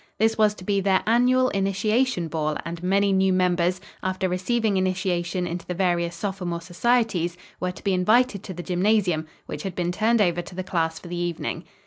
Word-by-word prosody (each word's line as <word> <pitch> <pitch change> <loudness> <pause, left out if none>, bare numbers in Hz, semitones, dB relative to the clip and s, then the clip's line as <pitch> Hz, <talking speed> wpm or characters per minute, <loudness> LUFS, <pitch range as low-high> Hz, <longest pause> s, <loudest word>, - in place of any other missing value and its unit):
This 225 +2 +2
was 210 -1 +3
to 185 - -11
be 200 +1 +1
their 190 -1 +2
annual 250 +3 +4
Initiation 200 +1 +1
Ball, 155 -2 -1
and 170 +1 -5
many 195 +2 +2
new 190 0 +3
members, 180 -1 +2 0.2
after 185 0 -1
receiving 205 +4 0
initiation 185 -1 0
into 175 0 -4
the 180 - -3
various 175 -2 0
sophomore 180 -2 -3
societies, 180 -1 0 0.2
were 180 - -1
to - - -13
be 195 - +1
invited 215 +3 +3
to 185 - -6
the 175 - -6
gymnasium, 180 -3 +1 0.2
which - - -6
had 190 -3 -5
been 175 -1 -1
turned 220 +5 +2
over 175 -4 +2
to 175 +1 -11
the 185 - -3
class 165 -3 -1
for 175 - -11
the 175 0 -5
evening. 170 0 -3
185 Hz, 190 wpm, -24 LUFS, 175-205 Hz, 0.2 s, annual